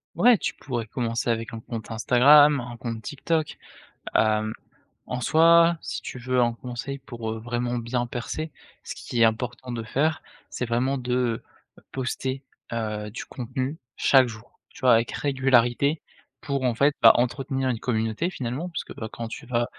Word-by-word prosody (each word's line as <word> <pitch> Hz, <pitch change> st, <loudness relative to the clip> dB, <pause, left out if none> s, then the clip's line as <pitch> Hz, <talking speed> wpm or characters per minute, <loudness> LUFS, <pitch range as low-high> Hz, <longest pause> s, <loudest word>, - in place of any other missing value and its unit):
Ouais 245 Hz, -2 st, +6 dB
tu -, -, -2 dB
pourrais 120 Hz, -4 st, -4 dB
commencer 120 Hz, 0 st, -2 dB
avec 115 Hz, -1 st, -1 dB
un 115 Hz, -, -6 dB
compte 115 Hz, -2 st, -7 dB
Instagram, 140 Hz, +6 st, +6 dB
un 120 Hz, 0 st, -7 dB
compte 115 Hz, -2 st, -5 dB
TikTok, 150 Hz, +5 st, -2 dB, 0.6 s
hem, 110 Hz, 0 st, +2 dB, 0.5 s
en 125 Hz, 0 st, -4 dB
soi 165 Hz, +4 st, +5 dB
si -, -, -5 dB
tu 125 Hz, -, -7 dB
veux 125 Hz, +1 st, +1 dB
un 120 Hz, -1 st, +3 dB
conseil 125 Hz, +3 st, -6 dB
pour, 120 Hz, -4 st, -6 dB
heu, 110 Hz, -, -5 dB
vraiment 120 Hz, +1 st, -2 dB
bien 120 Hz, +1 st, -1 dB
percer 155 Hz, +7 st, -4 dB, 0.3 s
ce -, -, -6 dB
qui 120 Hz, -, -3 dB
est -, -, +8 dB
important 120 Hz, +2 st, -2 dB
de 115 Hz, -1 st, -4 dB
faire, 145 Hz, +8 st, 0 dB, 0.3 s
c'est 125 Hz, -, -3 dB
vraiment 125 Hz, +4 st, 0 dB
de 125 Hz, -2 st, -1 dB, 0.5 s
poster, 130 Hz, +1 st, -3 dB, 0.3 s
heu, 105 Hz, -2 st, -3 dB
du 115 Hz, -, -6 dB
contenu 130 Hz, +4 st, -4 dB, 0.2 s
chaque 130 Hz, -2 st, +5 dB
jour, 115 Hz, 0 st, -12 dB
tu -, -, -16 dB
vois? 130 Hz, -1 st, +6 dB
Avec 115 Hz, +1 st, +1 dB
régularité 135 Hz, +1 st, +2 dB, 0.4 s
pour 140 Hz, -2 st, -2 dB
en 125 Hz, -2 st, +1 dB
fait 140 Hz, +5 st, +3 dB
bah 115 Hz, -, +9 dB
entretenir 135 Hz, +2 st, 0 dB
une 120 Hz, -3 st, -1 dB
communauté 115 Hz, +7 st, -1 dB
finalement 135 Hz, +2 st, -4 dB
parce 170 Hz, -, -4 dB
que -, -, -10 dB
quand 115 Hz, +1 st, -6 dB
tu 115 Hz, -, -9 dB
vas 120 Hz, -1 st, +1 dB
125 Hz, 170 wpm, -25 LUFS, 115-135 Hz, 0.6 s, bah